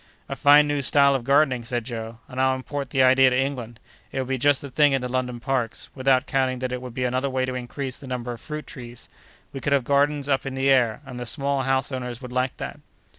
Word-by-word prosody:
"A - - -4
fine 145 +1 +6
new 145 -1 0
style 140 +1 +5
of 135 -3 -1
gardening," 135 -2 +3
said 120 -1 -3
Joe, 115 -1 -6
"and 130 0 -3
I'll 130 0 +3
import 140 +1 -5
the 130 0 +3
idea 130 0 +6
to 125 - 0
England. 125 -4 -3 0.3
It - - -6
would 130 -1 -2
be 135 -1 -1
just 145 +1 +3
the 140 - -9
thing 145 0 +4
in 135 - +1
the 125 - -3
London 125 -1 -2
parks; 125 -2 -2
without 130 0 +2
counting 130 -3 0
that 130 0 -3
it 125 0 -4
would 125 -2 -9
be 130 - -2
another 130 +2 0
way 130 -1 0
to 130 - -4
increase 125 +1 -5
the 140 - -11
number 125 -1 -4
of 120 - -8
fruit 150 -1 -6
trees. 120 -2 -10 0.4
We 135 - -5
could 140 - 0
have 140 -2 +2
gardens 145 +1 +1
up 135 -2 +1
in 135 -1 -5
the 135 +1 +2
air; 125 -3 +2
and 125 -2 -8
the 120 - -5
small 140 +1 0
house 135 +1 0
owners 125 -2 -5
would 125 -2 -9
like 125 0 -1
that!" - - -6
130 Hz, 255 wpm, -24 LUFS, 125-140 Hz, 0.4 s, fine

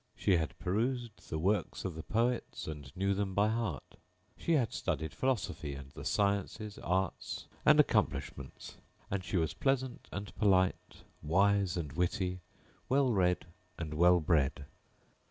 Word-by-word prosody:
She 95 -3 +3
had 80 -2 -2
perused 115 +4 -2
the 80 - -2
works 100 +6 0
of 95 - -2
the 80 - -6
poets 120 +6 -1
and 75 -3 -7
knew 100 +1 +2
them 95 -1 -2
by 105 +1 +4
heart; 110 - -3 0.4
she 170 - 0
had 130 -7 +2
studied 80 0 -2
philosophy 90 - -1
and 70 0 -9
the - - -9
sciences, 100 +1 0
arts 95 +2 -2 0.2
and - - +7
accomplishments; - - 0 0.3
and 100 -1 -1
she 90 +2 -1
was 80 -2 +1
pleasant 130 -2 -1
and 100 +1 -5
polite, 95 -3 +2 0.2
wise 95 +3 +3
and 75 -5 -4
witty, 90 +2 0 0.5
well 135 -2 +3
read 90 -4 +2 0.3
and 80 -2 -4
well 90 +3 +5
bred. 75 -3 +1
95 Hz, 145 wpm, -33 LUFS, 80-105 Hz, 0.5 s, and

